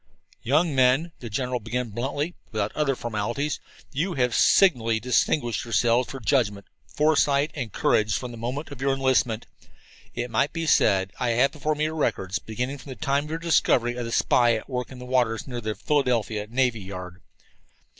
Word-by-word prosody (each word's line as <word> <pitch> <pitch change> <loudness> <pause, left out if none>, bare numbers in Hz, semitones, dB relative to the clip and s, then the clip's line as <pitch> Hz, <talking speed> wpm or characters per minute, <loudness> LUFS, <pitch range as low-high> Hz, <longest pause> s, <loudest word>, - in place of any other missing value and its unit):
"Young 155 +5 +2
men," 130 +6 +3
the 120 - -7
general 125 +3 -2
began 120 +2 -3
bluntly, 140 - -2 0.2
without 105 -2 -2
other 145 -3 +1
formalities, 120 +6 -2 0.3
"you 170 +6 -1
have 125 -3 +1
signally 115 - +4
distinguished 120 +1 +1
yourselves 120 +1 +2
for 135 - -6
judgment, 110 -6 0 0.2
foresight, 150 -1 +2
and 115 -4 -5
courage 105 +2 +2
from 125 -2 -6
the - - -8
moment 130 +6 -4
of 135 -2 -9
your 135 0 +2
enlistment, 130 -4 +1 0.7
it 120 0 -3
might 115 +6 +1
be 165 0 -2
said. 95 -10 +3
I 125 - 0
have 135 +3 +4
before 150 0 -2
me 150 - -1
your 155 +1 -1
records, 100 -10 -1
beginning 125 +6 -4
from 130 - -12
the 130 - -6
time 140 +3 0
of - - -9
your 160 - -2
discovery 140 -7 +2
of 120 -1 -4
the 115 - -5
spy 120 0 +3
at 110 - -6
work 125 -1 -4
in 130 - -9
the 125 - -9
waters 125 -3 +1
near 120 -2 -5
the 110 -1 -3
Philadelphia 115 -4 0
Navy 120 -2 +1
Yard. 90 -1 -8
125 Hz, 185 wpm, -25 LUFS, 115-140 Hz, 0.7 s, signally